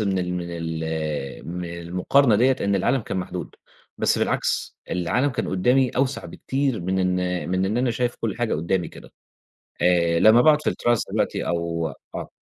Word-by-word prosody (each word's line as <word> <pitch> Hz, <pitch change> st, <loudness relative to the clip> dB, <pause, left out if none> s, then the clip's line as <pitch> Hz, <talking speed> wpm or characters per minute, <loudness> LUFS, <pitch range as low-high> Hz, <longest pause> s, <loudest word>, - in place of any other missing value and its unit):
من 100 Hz, -3 st, 0 dB
ال 90 Hz, 0 st, -2 dB
من 90 Hz, -1 st, -3 dB
ال 80 Hz, -4 st, -4 dB
من 90 Hz, +1 st, -4 dB, 0.2 s
المقارنة 100 Hz, +8 st, +3 dB
ديَّة 130 Hz, +3 st, +3 dB
إن 100 Hz, 0 st, +1 dB
العالم 120 Hz, +7 st, +2 dB
كان 105 Hz, -, -5 dB
محدود، 90 Hz, -, -5 dB, 0.4 s
بس -, -, +2 dB
بالعكس، -, -, -1 dB
العالم 125 Hz, +11 st, +1 dB
كان -, -, -3 dB
قُدّامي 125 Hz, +8 st, +3 dB
أوسع 135 Hz, +1 st, -1 dB
بكتير 135 Hz, -4 st, -2 dB
من 95 Hz, +2 st, -1 dB
إن 90 Hz, -1 st, 0 dB
من 95 Hz, +1 st, +1 dB
إن 105 Hz, +4 st, -1 dB
أنا 125 Hz, 0 st, +1 dB
شايف 120 Hz, +1 st, -1 dB
كُلّ 110 Hz, -4 st, -2 dB
حاجة 120 Hz, -2 st, 0 dB
قدّامي 85 Hz, +3 st, -1 dB
كده، -, -, -14 dB, 0.7 s
آآ، 85 Hz, -1 st, +3 dB
لمّا 110 Hz, +2 st, +7 dB
باقعد 150 Hz, +2 st, +5 dB
في -, -, +1 dB
الterrace 120 Hz, -2 st, 0 dB
دلوقتي -, -, -1 dB
أو 85 Hz, -1 st, -1 dB, 0.3 s
آه. -, -, -5 dB
95 Hz, 175 wpm, -23 LUFS, 85-120 Hz, 0.7 s, لمّا